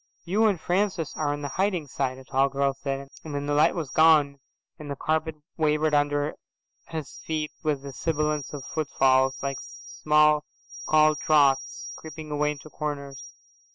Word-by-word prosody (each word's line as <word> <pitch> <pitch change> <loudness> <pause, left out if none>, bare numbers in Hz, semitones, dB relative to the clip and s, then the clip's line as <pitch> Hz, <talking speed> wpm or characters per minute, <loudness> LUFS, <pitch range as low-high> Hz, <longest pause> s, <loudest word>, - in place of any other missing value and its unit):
"You 210 +6 +3
and 195 -5 +1
Francis 180 -3 0
are 150 -2 0
on 145 0 -4
the - - -2
hiding 190 -5 +1
side," 130 -1 -2
a 130 - -11
tall 135 +1 +1
girl 140 0 0
said, 135 0 -5
and 150 -2 -6
then 145 0 -2
the 145 - -1
light 150 +1 +4
was 155 -6 -4
gone, 150 -3 +5 0.4
and 150 -1 -8
the 140 - -3
carpet 160 +2 -1 0.2
wavered 155 -1 +2
under 145 0 +1 0.5
his 160 -3 -6
feet 155 -1 -2
with 150 -3 -1
the 140 -1 -7
sibilance 150 -2 -1
of 145 -3 -6
footfalls, 135 -4 +2
like 140 -1 -2
small 150 0 +2 0.4
cold 155 0 +4
draughts, 140 -3 +2
creeping 155 -1 -9
away 150 0 +1
into 150 +1 -13
corners. 140 -3 -5
150 Hz, 165 wpm, -26 LUFS, 140-155 Hz, 0.5 s, gone